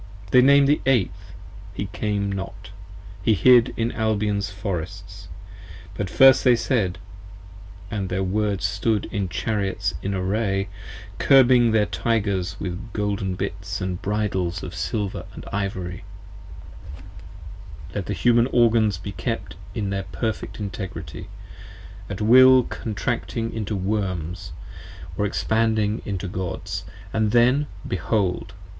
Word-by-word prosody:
They 125 - +7
nam'd 140 +1 +6
the 145 +2 +3
Eighth, 100 -6 0 0.4
he 100 - -3
came 100 -2 -1
not, 95 -1 -6 0.5
he 110 +3 +3
hid 120 +6 +6
in 115 +1 0
Albion's 105 -3 0
Forests. 95 -1 -6 0.7
But 100 -2 -3
first 135 +5 +6
they 125 -2 +6
said: 110 -7 0 0.5
(& 95 0 -17
their 95 -2 -2
Words 100 0 0
stood 110 -3 0
in 100 -3 -2
Chariots 95 +1 -1
in 100 0 -2
array, 95 +1 -1 0.5
35 - - -3
Curbing 125 -3 +6
their 110 -1 +3
Tygers 100 -7 -1
with 95 +5 -5
golden 100 -2 -1
bits 95 +1 -4
& 90 -1 -5
bridles 95 -5 -1
of 90 - -6
silver 100 +1 -3 0.2
& - - -11
ivory) 95 -2 -3 1.9
Let 100 -3 -4
the 105 - -1
Human 120 +3 +3
Organs 115 -6 +3
be 95 +3 -7
kept - - -4 0.2
in 100 -3 -2
their 95 -1 -2
perfect 110 -1 -3
Integrity, 95 -2 -6 0.8
At 100 0 -5
will 130 +3 +7
Contracting 115 +1 -3
into 110 -1 -3
Worms, 95 -4 -3 0.6
or 105 - 0
Expanding 110 0 0
into 100 -1 -3
Gods, 90 -1 -4 0.3
And 110 -1 +2
then, 125 +6 +3 0.2
behold! 95 0 -1
100 Hz, 125 wpm, -23 LUFS, 95-115 Hz, 1.9 s, They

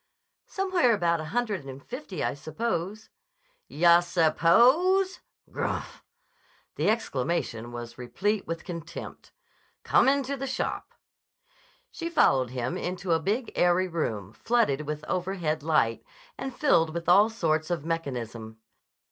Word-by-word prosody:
_" - - -27
"Somewhere 370 -10 +2
about 170 -4 +1
a - - -6
hundred 210 -1 -2
and 135 0 -9
fifty, 245 - -6
I - - 0
suppose." 180 +7 -4 0.6
"Yah 170 +2 +5
suppose. 240 - +3 0.3
Grmph!" - - -4 0.7
The - - +1
exclamation 130 - -1
was 120 0 -8
replete 200 - -1
with 165 0 -4
contempt. 170 -4 -8 0.5
"Come - - +4
into 280 0 0
the 270 0 -4
shop." - - -3 1.0
She 335 -1 -5
followed 135 - +3
him 125 0 -3
into 180 0 -3
a 165 - +4
big 215 +8 -2
airy 180 +1 +3
room 110 - -3
flooded 155 - +1
with 150 0 -4
overhead 175 -4 -1
light, 145 -7 +1 0.3
and 265 - -5
filled 170 - +2
with 170 -1 -4
all 200 +5 +6
sorts 160 -8 0
of 165 -4 -2
mechanism. 120 -9 -4
170 Hz, 130 wpm, -27 LUFS, 150-225 Hz, 1.0 s, all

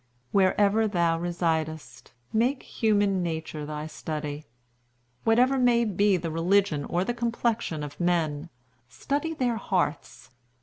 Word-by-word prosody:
"Wherever 205 +3 +3
thou 170 -4 +1
residest, 160 -3 -3 0.2
make 245 +5 +1
human 205 -4 +1
nature 160 -3 -4
thy 150 0 -5
study. 150 -1 -5 0.8
Whatever 250 +4 +4
may 240 -1 +4
be 200 -1 +2
the 165 -1 -4
religion 165 -2 +1
or 175 +1 0
the 240 - -2
complexion 235 -8 -1
of 145 0 -8
men, 170 -3 0 0.4
study 290 - -2
their 245 -5 0
hearts. 180 -9 -2
180 Hz, 120 wpm, -27 LUFS, 160-225 Hz, 0.8 s, Whatever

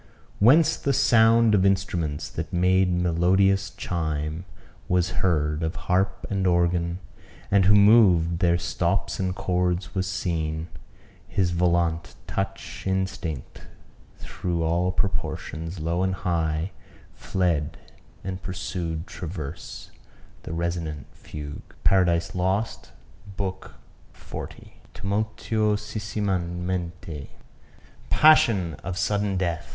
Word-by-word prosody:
"Whence 155 +9 +5
the 140 - 0
sound 115 -2 +5
Of 95 -2 +4
instruments, 90 -6 0
that 80 - -5
made 90 +1 +3
melodious 90 +3 +2
chime, 80 0 -3 0.4
Was 90 0 +1
heard, 75 -4 +1
of 80 +2 -2
harp 95 0 0
and 95 -2 0
organ; 85 -1 +1 0.5
and 100 -2 +4
who 100 +2 +6
mov'd 100 -6 +5
Their 85 -2 +3
stops - - -1
and 95 -1 -1
chords, 90 -1 -1
was 95 -1 -1
seen; 80 -3 -2 0.6
his 90 -3 0
volant 85 -1 +1
touch 95 -6 -4
Instinct 95 -7 -3 0.5
through 85 -2 -3
all 85 +3 +1
proportions, 80 -2 -3
low 85 +3 -1
and 95 0 +1
high, 85 -1 -1 0.4
Fled 85 -6 -1 0.5
and 95 0 -5
pursued 85 -3 -4
transverse 80 -3 -7 0.5
the - - -8
resonant 85 -2 -3
fugue." 75 -1 -9
Par. 95 -1 +5 0.3
Lost, 95 +4 -1 0.5
B. 95 -2 0 0.6
XL - - -7 0.5
Tumultuosissimamente. 100 -6 -2 0.8
Passion 110 - +5
of 90 0 -4
Sudden 100 0 0
Death! 85 -4 -2
90 Hz, 100 wpm, -25 LUFS, 85-95 Hz, 0.8 s, who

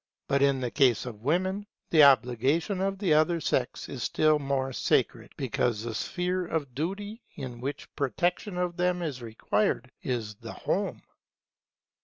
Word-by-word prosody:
But 140 0 +2
in 140 -1 +3
the 125 -2 -2
case 130 -6 +3
of 110 -4 -8
women, 185 - 0 0.2
the 160 - +7
obligation 140 - +3
of 195 0 0
the 190 -5 +2
other 155 +3 +3
sex 130 -5 -1
is 130 - -6
still 155 +3 +3
more 135 -2 -1
sacred, - - 0
because 115 -3 0
the 115 -1 -4
sphere 180 - -1
of 145 -6 -2
duty 200 - -4
in 125 -3 -7
which 140 +3 -5
protection 175 - -1
for 180 0 0
them 180 0 0
is 140 -6 -4
required, 115 +2 -1
is 115 -5 -2
the 110 0 -9
home. - - -2
140 Hz, 155 wpm, -28 LUFS, 125-180 Hz, 0.2 s, the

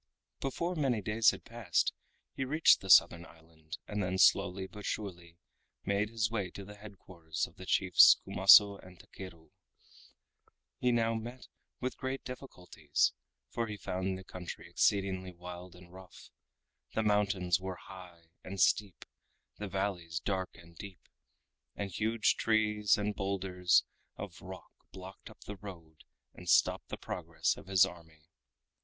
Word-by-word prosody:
Before 170 +6 -2
many 135 -8 0
days 105 +2 +3
had - - -4
passed 115 -7 0 0.4
he 135 - -3
reached 155 +5 +4
the 95 - -9
Southern 85 -2 +6
Island, 80 -1 -12
and 105 0 -3
then 95 0 -1
slowly 95 0 +3
but 105 +2 -11
surely 85 -6 -5 0.5
made 100 +2 0
his 110 -1 -1
way 100 -5 -2
to 100 - -8
the 105 - -10
head 105 -1 -12
quarters 80 -5 -5
of - - -15
the - - -11
chiefs - - +6
Kumaso 100 +1 +7
and 90 -1 -15
Takeru. 85 -5 -12 1.3
He 125 - +2
now 115 -1 +2
met 120 +3 -7 0.3
with 130 0 -4
great 130 +1 -4
difficulties, 90 - -2 0.4
for 115 -1 -2
he 105 -1 -6
found 95 0 -3
the 95 - -10
country 90 -1 -8
exceedingly 95 -2 0
wild 90 +1 -10
and 90 0 -16
rough. 95 -1 -14 0.6
The 110 - +1
mountains 100 -4 +1
were 95 0 -5
high 90 -4 -13
and 95 +1 -7
steep, 100 -1 +1 0.5
the 105 - -4
valleys 90 -4 -3
dark 95 +1 -3
and 85 0 -16
deep, 95 +1 -11 0.7
and 100 -1 -4
huge 110 +4 +1
trees 105 -2 +2
and 105 0 -1
bowlders 95 -2 +1 0.3
of - - -8
rock - - -10 0.2
blocked 95 +1 -11
up - - -17
the 105 - -8
road 85 -6 -12 0.3
and - - -9
stopped - - +3
the - - -5
progress - - -2
of - - -13
his 95 -2 +5
army. 80 -3 -12
95 Hz, 150 wpm, -32 LUFS, 90-105 Hz, 1.3 s, Kumaso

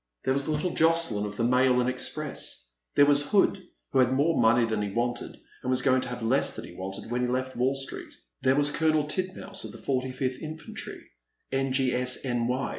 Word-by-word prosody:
There 130 - +2
was 140 +1 -2
little 155 +3 0
Jocdyn 160 -11 +2
of 105 0 -8
the 115 - 0
Mail 125 +1 +4
and 125 - +1
Express; 130 - -4 0.3
there 145 - +7
was 145 0 +5
Hood, 200 +3 +3 0.3
who 135 - +2
had 130 -1 +4
more 145 +5 +2
money 115 +1 +5
than 110 -2 -1
he 105 - -2
wanted 120 +3 -3 0.2
and 125 - -2
wa3 130 0 +2
going 130 -1 +4
to - - -4
have 125 -1 -5
less 130 +5 +1
than - - -7
he - - -11
wanted 95 +4 -7
when 125 +1 0
he 125 - +1
left 130 +1 -2
Wall 130 +3 +1
Street; 135 0 -5 0.3
there 130 - +3
was 145 0 +3
Colonel 155 0 +2
Tid 185 +5 -2
mouse 195 0 -4
of - - -6
the - - -10
45th 130 -1 -2
Infantry, 155 -1 -7 0.5
N.G.S.N.Y. 130 -1 0
130 Hz, 200 wpm, -27 LUFS, 125-145 Hz, 0.5 s, there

